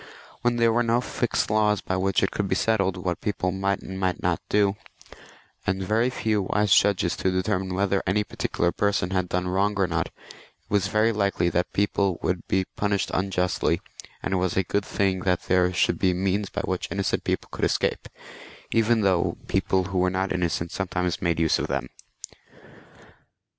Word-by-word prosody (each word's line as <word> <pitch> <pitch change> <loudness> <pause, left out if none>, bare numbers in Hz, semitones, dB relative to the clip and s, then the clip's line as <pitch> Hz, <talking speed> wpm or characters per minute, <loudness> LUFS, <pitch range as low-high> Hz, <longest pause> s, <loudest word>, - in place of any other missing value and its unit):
When 120 0 +2
there 115 -1 +3
were 120 - +3
no 115 0 +2
fixed 120 -3 -1
laws 105 -1 +3
by 95 - -3
which 95 +1 +1
it 95 - +1
could 100 - -2
be 95 - 0
settled 95 -3 +1
what 90 -1 -3
people 90 -3 -1
might 95 +1 -1
and 95 0 -6
might 95 -1 0
not - - 0
do, 100 -1 +3 0.9
and 95 0 0
very 110 +6 +2
few 110 -4 0
wise 105 +1 +2
judges 95 -4 +3
to 95 - +1
determine 95 0 -1
whether 100 0 +1
any 105 +2 +2
particular 85 -3 -1
person 100 -3 0
had 90 -2 0
done 90 0 -1
wrong 100 +3 +1
or 95 - +4
not, 85 -3 -1
it - - -19 0.6
was 100 -2 +2
very 110 +2 +2
likely 100 -4 +1
that 90 +1 -1
people 100 -2 +1
would 90 -2 -1
be 95 -1 +1
punished 100 -1 0
unjustly, 90 -1 0 0.4
and 95 - -2
it - - +2
was 90 -1 -1
a 95 - +3
good 100 +3 -1
thing 95 -2 0
that 90 -1 0
there 90 0 +2
should 90 - +1
be 90 -2 +2
means 95 +2 0
by - - -3
which 95 -1 -2
innocent 100 -1 -1
people - - -2
could - - -5
escape, - - 0 0.6
even 115 0 +3
though 95 -3 +1
people 95 -1 +1
who 90 0 -2
were 90 0 +3
not 95 +1 -1
innocent 85 -2 -1
sometimes 90 -2 -2
made 85 -2 0
use 80 -1 +2
of - - -2
them. 65 - -2
95 Hz, 190 wpm, -25 LUFS, 90-100 Hz, 0.9 s, or